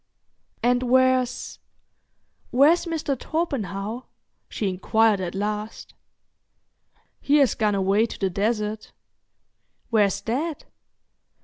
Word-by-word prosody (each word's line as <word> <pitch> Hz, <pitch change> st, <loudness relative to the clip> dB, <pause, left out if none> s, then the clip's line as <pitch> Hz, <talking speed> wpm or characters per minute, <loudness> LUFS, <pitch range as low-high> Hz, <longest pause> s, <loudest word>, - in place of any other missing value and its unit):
"And 245 Hz, +1 st, +3 dB
where's—where's 260 Hz, +4 st, 0 dB
Mr. 315 Hz, -4 st, -2 dB
Torpenhow?" 240 Hz, -, -3 dB, 0.4 s
she 210 Hz, -, -3 dB
inquired 205 Hz, +2 st, +2 dB
at 180 Hz, 0 st, -4 dB
last. 210 Hz, +2 st, -4 dB, 1.3 s
"He 285 Hz, -, +1 dB
has 280 Hz, -4 st, +4 dB
gone 210 Hz, -2 st, 0 dB
away 195 Hz, +3 st, +2 dB
to -, -, -8 dB
the 195 Hz, -2 st, -1 dB
desert." 210 Hz, +2 st, -2 dB, 1.0 s
"Where's 205 Hz, -4 st, +2 dB
that?" 290 Hz, +7 st, -3 dB
225 Hz, 90 wpm, -24 LUFS, 205-260 Hz, 1.3 s, has